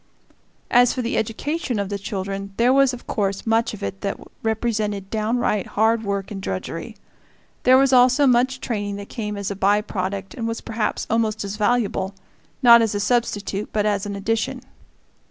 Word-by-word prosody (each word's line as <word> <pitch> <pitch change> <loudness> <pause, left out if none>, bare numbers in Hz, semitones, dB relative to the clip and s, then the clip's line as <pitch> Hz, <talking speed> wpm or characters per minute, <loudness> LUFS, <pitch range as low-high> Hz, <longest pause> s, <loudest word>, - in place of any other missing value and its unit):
As 245 0 +5
for 255 - -2
the 235 - -2
education 250 +4 -2
of 200 -1 -2
the 200 -1 -3
children, 195 -1 -5
there 245 +2 +4
was 275 -1 +5
of 250 -2 -9
course 195 -2 -2
much 225 0 +2
of 205 - -10
it 195 - -4
that 200 - -3 0.2
represented 215 -3 -1
downright 220 -2 0
hard 220 +1 +3
work 200 -1 -3
and 195 -2 -5
drudgery. 95 - -5 0.7
There 255 +1 +7
was 270 0 +4
also 255 +3 +5
much 255 +1 +3
training 205 -5 -3
that 200 0 -8
came 210 -3 -4
as 200 0 -3
a - - -3
by 200 +2 +3
product 195 -1 -4
and 230 -2 -4
was 230 0 -3
perhaps 220 -2 -2
almost 220 -1 0
as 200 0 -4
valuable 210 -3 0 0.5
not 235 -1 +9
as 220 -2 0
a - - 0
substitute 205 -2 -1
but 210 -1 0
as 205 -1 0
an 200 - -4
addition. 220 +3 -2
215 Hz, 180 wpm, -22 LUFS, 200-235 Hz, 0.7 s, not